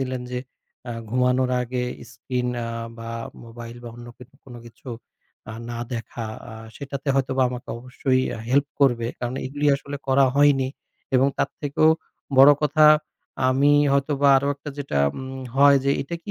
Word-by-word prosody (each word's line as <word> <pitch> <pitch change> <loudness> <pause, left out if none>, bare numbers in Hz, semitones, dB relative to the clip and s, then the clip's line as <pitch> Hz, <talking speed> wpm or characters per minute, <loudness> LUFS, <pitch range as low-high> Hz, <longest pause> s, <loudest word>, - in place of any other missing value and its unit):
দিলেন 130 -1 -3
যে 125 - -2 0.5
আ - - -4 0.2
ঘুমানোর 125 +1 +2
আগে 125 0 -3 0.3
screen 125 +2 -3 0.2
আ 115 - -4 0.3
বা 115 0 -7 0.3
mobile 115 0 -10
বা - - -6
অন্য 120 0 -10
ক - - -68 0.3
কোনো 120 -3 -11
কিছু 120 +3 -14 0.6
আ - - -7 0.2
না 120 - -5
দেখা 115 0 -5 0.2
আ - - -9 0.2
সেটাতে 140 0 -6
হয়তোবা 135 -1 +1
আমাকে 125 -1 -8
অবশ্যই 130 +1 -1 0.3
help 140 +2 +3
করবে। 120 -4 +3
কারণ 120 +1 -3
এগুলি 145 +2 -2
আসলে 140 +1 -7
করা 135 +1 +5
হয়নি 140 -2 +4 0.5
এবং 130 +1 +5
তার - - 0
থেকেও 145 +2 +2 0.5
বড় 140 +2 +10
কথা 155 +1 +4
আ - - -22 0.5
আমি 140 +3 +4 0.2
হয়তোবা 140 0 +2
আরও 140 +1 0
একটা 145 +1 -9
যেটা 140 - -2 0.2
উম 130 0 -7 0.2
হয় 140 0 +7
যে 140 - +2
এটা 140 +5 -6
কি 205 - -7
130 Hz, 165 wpm, -23 LUFS, 125-140 Hz, 0.6 s, বড়